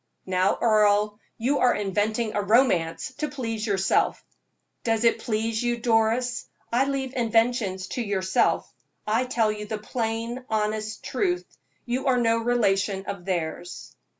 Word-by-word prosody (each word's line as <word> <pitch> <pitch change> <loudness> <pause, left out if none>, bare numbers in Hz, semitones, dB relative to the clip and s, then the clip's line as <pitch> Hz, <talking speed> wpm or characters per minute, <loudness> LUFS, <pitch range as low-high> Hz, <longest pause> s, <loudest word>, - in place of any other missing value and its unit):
"Now, 185 +1 +1
Earle, 210 -1 +3 0.2
you 265 +5 +1
are 250 -1 +4
inventing 215 +3 -1
a 205 - 0
romance 200 -3 +2
to 300 - 0
please 225 -5 -3
yourself." 195 -2 +1 0.6
"Does 225 -1 +1
it 230 - +3
please 220 0 -1
you, 240 0 0
Doris? 235 +1 +1 0.3
I 255 +3 +4
leave 270 -2 -2
inventions 225 -5 +1
to 245 - -3
yourself; 190 -4 +1 0.4
I 225 +4 +1
tell 230 -4 +1
you 210 0 -6
the 215 - -3
plain, 230 +2 -3
honest 215 0 -2
truth 360 -3 -1 0.4
you 255 +2 -2
are 255 -1 +4
no 230 -1 +2
relation 200 -4 +1
of 175 -3 -6
theirs." 175 -1 -4
225 Hz, 140 wpm, -25 LUFS, 205-245 Hz, 0.6 s, are